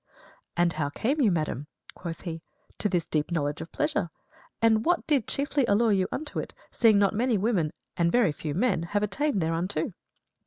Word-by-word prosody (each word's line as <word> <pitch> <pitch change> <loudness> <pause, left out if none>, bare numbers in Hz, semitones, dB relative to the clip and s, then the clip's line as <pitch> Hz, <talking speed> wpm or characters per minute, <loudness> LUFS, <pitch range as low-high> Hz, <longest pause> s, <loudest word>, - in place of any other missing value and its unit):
"And 175 0 +3
how 150 -2 -1
came 270 - 0
you, 230 - +5
madam," 155 -5 -1 0.3
quoth 170 -2 -7
he, 165 -3 -5 0.4
"to 210 - +1
this 175 -3 0
deep 150 -1 -1
knowledge 150 -3 -1
of 165 - -8
pleasure? 300 0 0 0.5
And 225 -1 +4
what 350 +4 +1
did 280 -8 +1
chiefly 280 0 0
allure 220 +2 +3
you 190 -2 +2
unto 305 +1 -4
it, - - -6 0.2
seeing 225 -3 +5
not 200 0 +3
many 235 +1 +2
women, 190 -7 +1 0.3
but 170 - +3
very 205 -1 +3
few 150 0 -5
men, 225 -3 +2
have 205 +5 -1
attained 210 +2 0
thereunto?" 165 +2 -1
200 Hz, 185 wpm, -27 LUFS, 165-235 Hz, 0.5 s, you